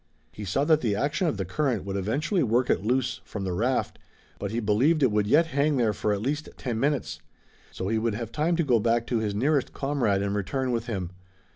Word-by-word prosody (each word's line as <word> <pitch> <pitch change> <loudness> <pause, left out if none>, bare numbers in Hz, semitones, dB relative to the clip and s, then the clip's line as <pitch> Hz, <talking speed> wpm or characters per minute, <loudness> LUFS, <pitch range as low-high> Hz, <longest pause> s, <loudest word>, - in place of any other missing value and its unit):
He 105 - -7
saw 100 +9 0
that 155 -1 +4
the 105 -4 0
action 145 - 0
of 135 - -1
the 95 - -2
current 120 - -1
would 100 0 -4
eventually 145 - 0
work 125 0 +2
it - - 0
loose 125 +3 0
from 100 - -6
the 95 -2 -2
raft, 125 +8 -1 0.4
but 100 - -3
he 115 +3 -2
believed 125 +9 +2
it 130 - +4
would 105 -1 +1
yet 155 +9 +5
hang 145 +1 +2
there 115 -4 +2
for 105 +1 -1
at 100 0 -1
least 145 +4 -2
ten 120 -4 -3
minutes. 125 - -1 0.5
So 95 - -4
he 110 +2 +1
would 115 -1 -1
have 115 0 -5
time 160 +5 +1
to 170 - +1
go 125 -6 +3
back 115 +1 +1
to 120 -2 0
his 105 -2 -2
nearest 140 +5 +1
comrade 125 -9 0
and 100 0 -1
return 125 +6 -1
with 115 -1 -2
him. 95 -6 -3
115 Hz, 235 wpm, -26 LUFS, 105-140 Hz, 0.5 s, yet